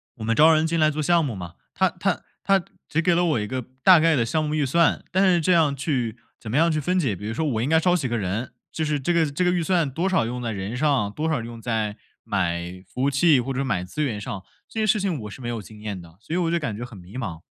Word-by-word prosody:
我 110 - -8
们 115 +1 +1
招 160 +5 +6
人 155 +1 +3
进 165 0 0
来 155 0 +5
做 155 0 -2
项 170 +1 +3
目 120 -6 -3
嘛， 85 -2 -8 0.2
他 - - +2
他 - - -1 0.2
他 195 -2 +2 0.2
只 155 - 0
给 175 0 +3
了 175 +1 +2
我 155 -9 +1
一 105 - -2
个 130 +4 -3 0.2
大 185 -3 +8
概 165 -1 +4
的 120 -3 +2
项 155 +7 0
目 150 0 -1
预 150 -2 +1
算。 165 +4 +2
但 190 +2 +3
是 175 -3 +4
这 180 - +2
样 155 -5 +4
去 125 -5 -2 0.2
怎 110 - -8
么 120 - -2
样 165 +2 +4
去 155 - 0
分 180 +6 0
解， 120 - 0
比 105 - -8
如 110 - -3
说 160 - -2
我 115 -6 0
应 130 - 0
该 160 +1 +4
招 180 0 +3
几 140 -5 -2
个 120 0 -1
人， 105 +5 -3 0.2
就 160 - -2
是 150 -1 0
这 140 +6 -1
个 165 -3 +2
这 150 +6 -1
个 180 - +3
预 175 -1 +1
算 165 -5 +1
多 170 +7 -1
少 185 -11 +2
用 125 +1 -4
在 115 -2 -3
人 100 +4 -4
上， 135 -8 +1
多 155 +7 -3
少 150 -7 0
用 115 0 -8
在 110 -2 -2 0.3
买 90 -2 -2
服 125 - -6
务 140 - +3
器 140 -1 +4
或 135 - -4
者 135 +1 -1
买 95 -8 -1
资 150 +12 -5
源 115 -8 -1
上， 105 -4 -5 0.3
这 225 - -5
些 215 - +1
事 210 0 +3
情 180 -8 -1
我 105 - -6
是 130 - -10
没 120 - -4
有 115 -3 -3
经 105 +1 -13
验 105 -3 -5
的， 85 -1 -15
所 155 - -7
以 - - +1
我 170 -2 +1
就 170 - +1
感 120 -10 -3
觉 120 - -5
很 115 -4 -12
迷 95 +6 -11
茫。 85 -10 -5
135 Hz, 325 characters per minute, -24 LUFS, 110-165 Hz, 0.3 s, 大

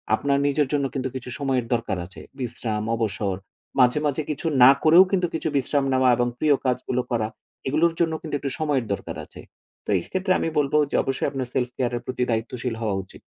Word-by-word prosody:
আপনার 140 +3 0
নিজের 145 0 +2
জন্য 140 -1 +1
কিন্তু 130 -1 -2
কিছু 125 -1 -6
সময়ের 135 -4 0
দরকার 115 -5 -1
আছে। 90 - -11 0.2
বিশ্রাম, 115 -3 -2
অবসর, 105 -3 -1 0.4
মাঝে, 125 +3 +5
মাঝে 145 +1 0
কিছু 150 +3 -3 0.2
না 130 - +10
করেও 165 +4 +8
কিন্তু 180 -3 +2
কিছু 160 - -2
বিশ্রাম 140 +1 +1
নেওয়া 130 0 +4
এবং 120 - +2
প্রিয় 150 -2 +4
কাজগুলো 125 0 0
করা, 115 -3 +1 0.4
এগুলোর 160 +5 +2
জন্য 165 -1 +2
কিন্তু 155 -4 -4
একটু 140 - -3
সময়ের 145 -6 0
দরকার - - -6
আছে। - - -12 0.4
তো - - -9
এক্ষেত্রে 185 - -2
আমি 165 - 0
বলবো 145 +1 +2
যে - - -1
অবশ্যই 135 +1 -1
আপনার 135 -3 -3
self-care 125 -1 -1
এর - - -6
প্রতি 125 -1 -1
দায়িত্বশীল 115 +1 -2
হওয়া 105 -3 0
উচিৎ। - - -15
130 Hz, 195 wpm, -24 LUFS, 120-145 Hz, 0.4 s, না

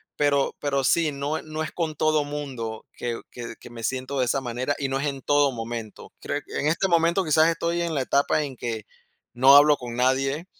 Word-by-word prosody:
pero 140 -1 +1
pero 140 -1 0
sí, 160 +3 +2
no 140 +3 -2
e - - -12
no 155 0 -4
es - - -5
con 160 -3 -3
todo 155 -1 +2
mundo 130 -7 -5
que 120 -1 -4
que 120 -1 -7
que - - -12
me 115 -1 -9
siento 130 +3 -2
de 130 - +3
esa 135 +3 0
manera 125 +3 -2
y 135 -2 -2
no 135 0 -1
es 145 - -1
en 135 -1 -4
todo 145 0 +3
momento. 115 -2 -7
Creo 145 +1 -3
que - - -5
en 150 - 0
este 165 +5 +1
momento 170 +2 +3
quizás 155 +1 +4
estoy 170 +1 -1
en 170 -2 -2
la 135 - +1
etapa 140 +3 +1
en 135 -2 -6
que 115 -3 -4 0.5
no 135 +3 +7
hablo 145 0 +7
con 120 -1 -7
nadie 135 +5 +1
140 Hz, 225 wpm, -25 LUFS, 125-155 Hz, 0.5 s, no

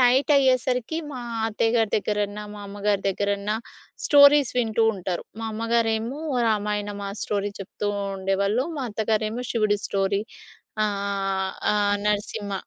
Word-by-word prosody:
నైటయ్యేసరికి 255 0 +3 0.2
మా 255 - -5 0.3
అత్తయ్యగారి 225 0 +1
దగ్గరన్నా, 210 0 -2
మా 205 - -9
అమ్మగారి 205 0 -1
దగ్గరన్నా 200 +2 -1 0.5
స్టోరీస్ 285 -2 +7
వింటూ 225 -2 +1
ఉంటారు. 180 -2 -3 0.2
మా 225 - -4
అమ్మగారేమో 230 +3 0 0.3
రామాయణం 210 -1 -1
ఆ - - -4
స్టోరీ 205 0 -1
చెప్తూ 200 +1 -4 0.3
ఉండేవాళ్ళు. 200 +5 +1
మా 280 - -2
అత్తగారేమో 220 +2 -1
శివుడి 215 -3 +2
స్టోరీ. 195 0 0 0.6
ఆహ్, 195 -2 -1 0.2
ఆ - - +3 0.3
నరసింహ. 205 0 -1
210 Hz, 115 wpm, -24 LUFS, 200-230 Hz, 0.6 s, స్టోరీస్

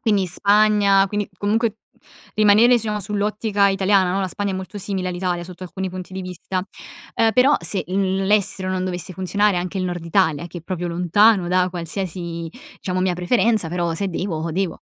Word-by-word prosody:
quindi 205 -5 +1
Spagna, 200 +1 +3
quindi 205 +1 -3
comunque 220 +2 0 0.6
rimanere, 215 +2 +5
diciamo, 210 -2 -2
sull'ottica 205 0 0
italiana, 195 -1 +2
no, 195 - 0
la 190 - -1
Spagna 200 +1 -3
è - - -3
molto 190 +2 -6
simile 190 -1 -3
all'Italia 175 -1 -2
sotto 180 +1 -11
alcuni 185 +1 -5
punti 185 0 -8
di 190 - -4
vista. 185 +1 -5 0.6
Uhm, 225 -1 +3
però 265 +6 +5
se 195 - -1
l 190 +1 0
l'estero 195 -2 +2
non 185 0 -1
dovesse 180 0 -4
funzionare, 190 +1 +1
anche 180 +2 -4
il 185 - -1
Nord 175 -2 -4
Italia 165 -3 +1
che 175 +1 -8
è - - -14
proprio 175 -1 -4
lontano 180 +3 +3
da 180 0 +2
qualsiasi 170 -1 -5 0.3
diciamo 185 -1 -2
mia 185 -1 +1
preferenza, 215 0 +1
però 170 -1 -1
se 195 +3 -2
devo, 170 -2 -3
devo. 185 -1 -2
190 Hz, 180 wpm, -21 LUFS, 180-205 Hz, 0.6 s, rimanere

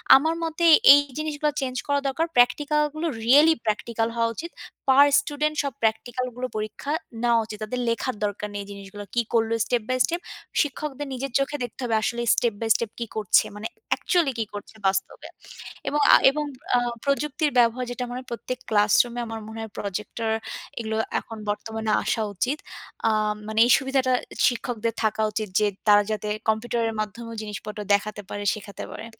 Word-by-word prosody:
আমার 315 +4 +3
মতে 330 +1 -1 0.3
এই 285 - +7 0.2
জিনিসগুলা 300 -1 -1
চেঞ্জ 255 -1 -3
করা 285 0 +2
দরকার। 320 +5 0
প্র্যাকটিক্যালগুলো 300 +5 +2 0.2
রিয়েলি 295 +6 +7
প্র্যাকটিক্যাল 225 +1 -1
হওয়া 230 0 +1
উচিত। 335 +1 -6 0.4
পার 280 +2 +7
স্টুডেন্ট 300 +1 -2
সব 280 -3 -3
প্র্যাকটিক্যালগুলো 245 +3 -1
পরীক্ষা 215 +7 -4 0.3
নেওয়া 235 -1 +4
উচিত। 215 -1 -8
তাদের 250 +4 -3
লেখার 230 +1 -1
দরকার 205 0 -4
নেই 200 - -3
জিনিসগুলো। 200 +1 -9
কি 240 - +4
করল? 225 -1 +2
স্টেপ 240 -3 0
বাই 255 - +1
স্টেপ, 345 +1 -3 0.4
শিক্ষকদের 290 -1 -3
নিজের 265 0 -4
চোখে 285 +2 -1
দেখতে 245 - -7
হবে 230 -2 0
আসলে 235 +2 -1
স্টেপ 235 -3 +1
বাই 225 - -1
স্টেপ 230 -2 -2
কি 235 - -2
করছে? 210 -4 +4
মানে 215 +2 -4 0.3
একচুয়ালি 340 -7 +1
কি 220 - 0
করছে 205 +1 -8
বাস্তবে? 190 0 -2 0.6
এবং 295 - 0
আ - - +11 0.2
এবং 300 +1 -2 0.3
আ - - +4 0.3
প্রযুক্তির 290 +1 0
ব্যবহার 240 +2 +3
যেটা 250 +1 -4
মনে 250 +1 -4
হয়, 255 - -13
প্রত্যেক 250 +2 -4
ক্লাসরুমে 215 +3 +3
আমার 225 0 -5
মনে 220 0 -8
হয় 220 -2 -7
প্রজেক্টর 210 +3 -4 0.5
এগুলো 220 -1 -2 0.2
এখন 225 - -10
বর্তমানে 220 +1 -2
আসা 225 - 0
উচিত। 260 +10 0 0.5
আ - - +5 0.4
মানে 220 0 -1
এই 245 - +3
সুবিধাটা 265 -1 +1 0.3
শিক্ষকদের 230 -2 -1
থাকা 220 0 +1
উচিত 215 -1 -3
যে, 210 - +3 0.2
তারা 205 0 +7
যাতে 210 0 -3 0.2
কম্পিউটারের 225 +1 0
মাধ্যমেও 230 +2 -5
জিনিসপত্র 210 0 -7
দেখাতে 205 +1 0
পারে, 205 0 -4
শেখাতে 205 -2 -8
পারে। 225 - -7
235 Hz, 170 wpm, -25 LUFS, 215-275 Hz, 0.6 s, আ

